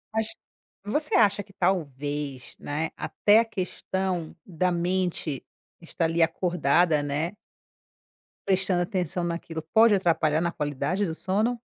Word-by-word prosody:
Acho 220 0 +1 0.5
você 300 +9 0
acha 205 -2 +4
que 195 - -21
talvez, 145 -7 -2
né, 155 +3 -3
até 210 +1 +3
a 230 - +2
questão 190 -4 -3
da 180 0 0
mente 175 -5 -1 0.4
está 170 0 -2
ali, 165 +1 +1
acordada, 165 -2 +2
né. 145 +5 -2 1.1
Prestando 190 -2 +2
atenção 180 -1 -1
naquilo 170 -1 -4
pode 220 -1 +6
atrapalhar 160 -4 +2
na 170 0 0
qualidade 150 +7 -1
do 160 -3 -3
sono? 215 +8 0
175 Hz, 125 wpm, -26 LUFS, 160-195 Hz, 1.1 s, pode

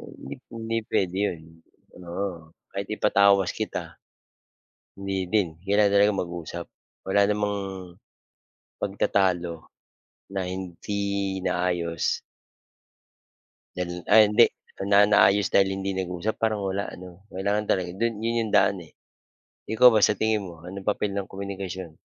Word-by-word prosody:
hindi 70 - -8
hindi 115 0 -4
pwede 95 -2 0
yun, 80 -2 -5 0.7
oo. 85 -3 -5 0.2
Kahit 100 0 -4
ipatawas 100 -3 +3
kita, - - -5 1.0
hindi 95 -2 -3
din. 105 -3 +2
Kailangan 100 +1 +3
talaga 100 +1 +5
mag-usap, 85 -1 -6 0.4
wala 100 +1 +3
namang, 105 0 0 1.2
pagtatalo 90 -4 0 0.7
na 95 -2 -2
hindi 95 +1 -5 0.5
naayos. 85 -3 -1 1.5
Dyan 90 -1 -4
ay 110 - +9
hindi. 115 +3 +7 0.4
Na 100 0 +7
naayos 100 -1 +4
dahil 95 -1 +5
hindi 95 0 -2
nag-usap? 95 +3 -2
Parang 110 -2 +1
wala 95 +1 -2
ano? 90 0 -12
Kailangan 100 +2 -1
talaga 90 -2 +1
do'n 115 0 +1
'yon 115 +1 0
'yong 110 - -3
daan - - +4
eh. - - -21 0.8
Ikaw 125 +3 +7
ba 110 - +4
sa 105 - +5
tingin 110 -1 +1
mo, 85 -2 -12
anong 95 +2 -8
papel 105 -1 0
ng 100 -1 -2
komunikasyon? 95 -3 -6
95 Hz, 125 wpm, -25 LUFS, 90-105 Hz, 1.5 s, ay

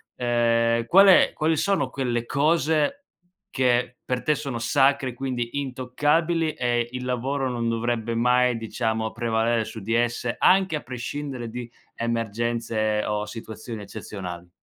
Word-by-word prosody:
ehm, 115 -1 +1
qual 195 +6 +7
è 185 - +6
quali 155 +1 +1
sono 145 -8 +1
quelle 120 -3 -2
cose 155 - +2 0.6
che 125 -1 +1
per 125 0 -1
te 150 -1 +2
sono 135 -5 -4
sacre, 135 0 +2
quindi 125 -2 -3
intoccabili, 150 +5 0
e 120 -1 0
il 125 0 -5
lavoro 130 +2 -1
non 120 -1 -2
dovrebbe 115 0 -1
mai, 125 +1 +3
diciamo, 110 -1 -2
prevalere 115 -1 0
su 110 - -8
di 115 +4 -2
esse 120 0 0
anche 190 -2 +4
a 150 - -3
prescindere 125 0 -5
di 120 0 -6 0.3
emergenze 115 -1 -1
o 105 0 -1
situazioni 110 0 -8
eccezionali? 90 -4 -8
120 Hz, 135 wpm, -24 LUFS, 115-135 Hz, 0.6 s, qual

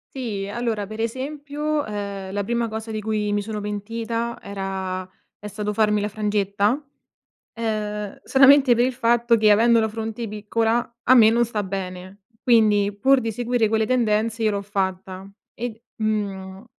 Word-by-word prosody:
Sì, 215 -7 -3
allora 220 -1 -2
per 215 +2 -9
esempio, 290 +5 -2
ehm, 200 -2 -5
la 205 0 -1
prima 235 +2 -1
cosa 220 0 -6
di 215 0 -3
cui 210 -1 -1
mi 205 - +1
sono 210 0 -5
pentita 230 +3 -3
era 190 -2 -4 0.3
è 210 - -8
stato 210 0 -3
farmi 210 -1 +2
la 210 - -1
frangetta, 205 +2 0 0.7
ehm, 210 -2 -3
solamente 270 -1 +6
per 240 +1 +3
il 255 - -2
fatto 235 0 +3
che 215 -1 +4
avendo 230 +2 +5
la 220 - +1
fronte 225 +1 -4
piccola 225 +3 -1
a 255 - +5
me 225 -3 +8
non 235 +1 +3
sta 220 -2 -3
bene, 190 0 -6 0.2
quindi 210 -4 +4
pur 265 +3 +4
di 225 - -2
seguire 240 -1 0
quelle 220 0 +1
tendenze 225 -2 +1
io 215 - +2
l'ho 200 0 -2
fatta 190 -1 -3 0.2
e 245 +1 -4
d 220 - -22 0.2
mhmm, 195 -2 -3
215 Hz, 165 wpm, -23 LUFS, 205-235 Hz, 0.7 s, me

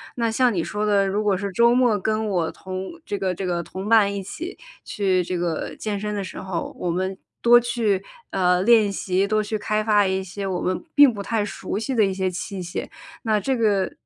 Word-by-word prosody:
那 230 -2 0
像 245 0 +3
你 170 - 0
说 210 +4 -2
的， 200 -1 +3
如 205 +2 0
果 200 -2 +2
是 200 0 -3
周 235 +5 +4
末 240 -5 +3
跟 215 +2 -1
我 175 -5 0
同 185 0 -6 0.2
这 205 - -3
个 185 -2 -1
这 195 - -4
个 175 -1 -1
同 190 +4 -7
伴 215 -3 +5
一 195 - -4
起 335 - -7 0.3
去 190 -3 +1
这 180 +1 -3
个 170 -2 -2
健 205 -2 -3
身 210 0 -3
的 200 - -2
时 185 - -7
候， 185 -3 -4
我 180 - -2
们 190 +2 -2 0.2
多 240 0 +7
去， 230 -5 0 0.3
呃， 180 -1 +2
练 220 -1 +5
习、 195 0 0
多 215 +1 +1
去 215 +1 -2
开 215 0 0
发 210 -2 +3
一 190 0 -1
些 195 +1 -5
我 185 -2 -2
们 185 0 -1
并 285 -4 +7
不 205 - -5
太 215 +1 -1
熟 205 - -4
悉 225 +5 -2
的 220 -4 +4
一 195 - -1
些 190 -1 -1
器 190 +1 -5
械， 175 - -5 0.4
那 215 -2 +2
这 260 +5 0
个， 205 -4 +1
200 Hz, 245 characters per minute, -23 LUFS, 185-220 Hz, 0.4 s, 多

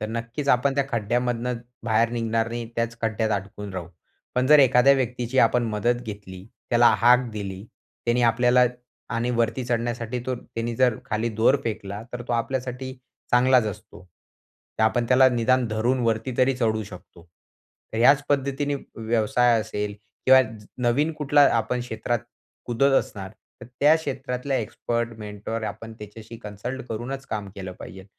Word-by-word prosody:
तर 110 - -2
नक्कीच 115 +5 -4
आपण 135 +2 0
त्या 140 -1 +1
खड्ड्यामधनं 120 +1 -1 0.3
बाहेर 115 0 +3
निघणार 115 -1 -1
नाही. 120 0 -4
त्याच 115 0 -1
खड्ड्यात 110 0 0
अडकून 100 0 -9
राहू. 85 -3 -5 0.5
पण 125 +1 +2
जर 150 +1 +7
एखाद्या 130 0 +6
व्यक्तीची 125 -1 -2
आपण 120 +1 +4
मदत 120 +3 0
घेतली. 100 -4 -9 0.3
त्याला 120 0 +6
हाक 125 +1 +6
दिली. 100 -2 -5 0.4
त्याने 120 +1 +2
आपल्याला 120 +2 +4 0.5
आणि 120 +2 0
वरती 115 +3 0
चढण्यासाठी 120 0 -2
तो 130 - 0
त्याने 115 0 -5
जर 125 -3 +3
खाली 115 -1 -1
दोर 130 +5 +5
फेकला, 105 -2 -4
तर 120 0 -5
तो - - 0
आपल्यासाठी 130 +2 -2 0.4
चांगलाच 125 -1 +4
असतो. 95 -2 -8 0.7
आपण 115 +2 +2
त्याला 130 +1 +6
निदान 125 +1 +2
धरून 115 +4 0
वरती 115 +3 0
तरी 130 +1 +4
चढू 110 -3 0
शकतो. 90 -3 -13 0.7
तर 110 - -3
ह्याच 140 +4 +5
पद्धतीने 140 0 0 0.2
व्यवसाय 115 +1 +2
असेल 105 -1 -4 0.3
किंवा 130 0 +8 0.5
नवीन 145 +7 +1
कुठला 145 -1 +3
आपण 120 +2 -1
क्षेत्रात 120 0 -2 0.5
कुदत 135 +3 +2
असणार. 95 -2 -6 0.3
तर - - -10
त्या 150 +2 +6
क्षेत्रातल्या 135 -2 -3
एक्सपर्ट 115 +1 -2
मेंटॉर 105 +2 -5
आपण 110 +2 -6
त्याच्याशी 105 +2 -10
कन्सल्ट 115 +6 -6
करूनच 130 +5 -5
काम 105 -2 -4
केलं 95 -1 -6
पाहिजे. 95 +1 -10
120 Hz, 150 wpm, -24 LUFS, 110-125 Hz, 0.7 s, किंवा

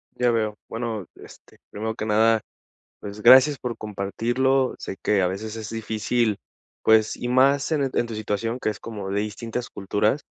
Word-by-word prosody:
Ya 125 -1 +2
veo. 110 -2 0
Bueno, 115 -4 -4
este, - - -16
primero 110 +2 -4
que 110 - -4
nada, 110 +1 +3 0.6
pues, 105 +1 -8
gracias 130 +4 +7
por 120 -2 -4
compartirlo. 120 +6 0
Sé 95 - -6
que 100 -2 +2
a - - +3
veces 110 +4 -5
es 110 -1 -6
difícil, 110 0 -1 0.5
pues, 110 -1 +4
y 120 - -4
más 135 +4 +3
en 140 -4 +1
en 120 - +1
tu 115 - -6
situación 110 +2 -2
que - - -1
es 105 - -7
como 105 -4 -6
de 100 +1 0
distintas 115 +3 -5
culturas, 105 +7 0
110 Hz, 175 wpm, -24 LUFS, 105-120 Hz, 0.6 s, gracias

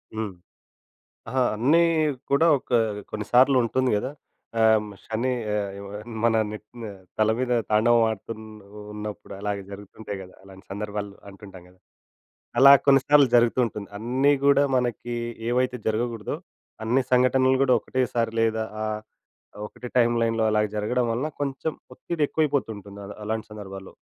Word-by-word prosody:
హ్మ్. 110 -3 -3 0.9
అహా! 130 +2 +1
అన్నీ 140 +10 +4 0.5
కూడా 140 +4 +4
ఒక 130 - -16 0.4
కొన్ని 105 -1 -4
సార్లు 130 +2 +6
ఉంటుంది 130 +2 0
కదా! 125 +6 -3 0.5
ఆహ్, 110 -1 +4
శని 115 +4 -1 0.2
ఎ - - +1 0.7
మన 115 -1 +3 0.2
నెత్తి 105 +2 -11
మీద 105 -3 -7 0.2
తల 110 0 +4
మీద 125 -1 0 0.2
తాండవం 115 +2 +4
ఆడుతు 110 +1 -5
ఉన్నప్ 105 -1 -12
ఉన్నప్పుడు 105 0 -7
అలాగే 100 -1 -3
జరుగుతుంటాయి 100 0 -8
కదా! 90 - -14
అలాంటి 95 -1 -15
సందర్భాలు 105 0 -4 0.2
అంటుంటాం 95 -2 -13
కదా! 90 0 -24 0.8
అలా 140 +1 +10
కొన్ని 135 -1 +6
సార్లు 145 -2 +6
జరుగుతూ 120 +1 +4
ఉంటుంది. 105 -3 -6
అన్నీ 130 +6 +2
గూడా 140 0 +5
మనకి 120 -1 -2 0.3
ఏవైతే 125 +1 +1
జరగకూడదో, 115 -1 -2 0.5
అన్ని 125 +4 +2
సంఘటనలు 130 +1 +4
కూడా 130 -2 +4
ఒకటేసారి 120 -3 -1
లేదా 110 0 +1 0.2
ఆహ్, 110 0 -3 0.7
ఒకటే 125 +2 -9
టైమ్‌లైన్‌లో 115 -1 +2
అలాగ 105 0 +2
జరగడం 120 +4 0
వలన 125 +7 -1
కొంచెం 140 +2 -2 0.2
ఒత్తిడి 170 +4 -4
ఎక్కువైపోతు 145 -6 0
ఉంటుంది 100 0 -11
అ - - -10 0.2
అలాంటి 110 +1 -3
సందర్భాల్లో. 95 -2 -9
115 Hz, 140 wpm, -25 LUFS, 105-130 Hz, 0.9 s, అలా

